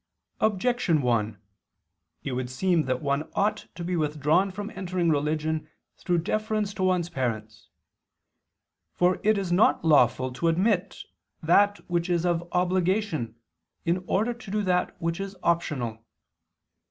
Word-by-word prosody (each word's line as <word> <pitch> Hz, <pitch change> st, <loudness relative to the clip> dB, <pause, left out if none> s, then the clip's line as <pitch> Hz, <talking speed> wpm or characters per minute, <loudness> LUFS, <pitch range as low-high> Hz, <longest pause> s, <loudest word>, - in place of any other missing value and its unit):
Objection 210 Hz, -, +1 dB
1: 110 Hz, -4 st, 0 dB, 0.9 s
It 140 Hz, -, -3 dB
would 125 Hz, 0 st, -3 dB
seem 170 Hz, +4 st, +1 dB
that 130 Hz, +1 st, -2 dB
one 140 Hz, +2 st, -1 dB
ought 210 Hz, +2 st, 0 dB
to 170 Hz, -, -6 dB
be 180 Hz, +1 st, -1 dB
withdrawn 155 Hz, +4 st, +2 dB
from 205 Hz, +3 st, -6 dB
entering 180 Hz, -4 st, -1 dB
religion 155 Hz, +1 st, -1 dB, 0.3 s
through 175 Hz, -2 st, 0 dB
deference 215 Hz, +3 st, -1 dB
to 195 Hz, -, -6 dB
one's 185 Hz, -2 st, +2 dB
parents. 115 Hz, -8 st, -4 dB, 1.3 s
For 180 Hz, +1 st, +2 dB
it 215 Hz, 0 st, +3 dB
is 190 Hz, -3 st, -2 dB
not 175 Hz, -2 st, +3 dB
lawful 130 Hz, -4 st, +4 dB
to 165 Hz, +6 st, 0 dB
omit 190 Hz, +2 st, 0 dB, 0.4 s
that 205 Hz, +5 st, +3 dB
which 175 Hz, 0 st, -1 dB
is 175 Hz, -1 st, +1 dB
of 175 Hz, 0 st, 0 dB
obligation 180 Hz, -, 0 dB, 0.5 s
in 175 Hz, +2 st, 0 dB
order 220 Hz, +5 st, +1 dB
to 235 Hz, -3 st, -12 dB
do 210 Hz, +1 st, 0 dB
that 180 Hz, -2 st, 0 dB
which 165 Hz, +1 st, -2 dB
is 195 Hz, 0 st, -5 dB
optional. 130 Hz, -10 st, -1 dB
175 Hz, 140 wpm, -26 LUFS, 150-195 Hz, 1.3 s, lawful